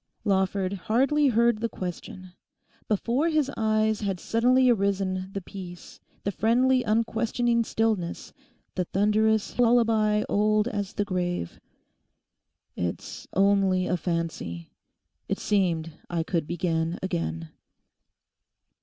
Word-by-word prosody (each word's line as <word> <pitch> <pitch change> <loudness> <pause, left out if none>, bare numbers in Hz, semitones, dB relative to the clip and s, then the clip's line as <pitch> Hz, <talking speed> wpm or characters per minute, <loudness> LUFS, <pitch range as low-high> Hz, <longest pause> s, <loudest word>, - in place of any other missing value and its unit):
Lawford 190 -1 +1
hardly 265 - +2
heard 235 -2 +3
the 230 +1 -1
question. 185 0 -7 0.6
Before 240 - +1
his 305 -4 +1
eyes 215 -1 +1
had 195 -3 -2
suddenly 250 +5 +3
arisen 195 -4 +1
the 195 - -4
peace, 180 -2 -10 0.2
the 200 - -1
friendly 250 +5 +3
unquestioning 230 +1 +1
stillness, 220 -7 -2 0.4
the 180 - -1
thunderous 215 +4 +1
lullaby 225 -3 +3
old 215 +1 +2
as 205 -4 -3
the 205 - -1
grave. 175 - -3 1.2
'It's 90 -1 -5
only 195 -1 +3
a 180 - 0
fancy. 165 - -4 0.6
It - - 0
seemed 170 -5 0 0.2
I 170 -2 -1
could 165 -2 -2
begin 165 -1 -1
again. 80 - -3
200 Hz, 110 wpm, -26 LUFS, 180-225 Hz, 1.2 s, heard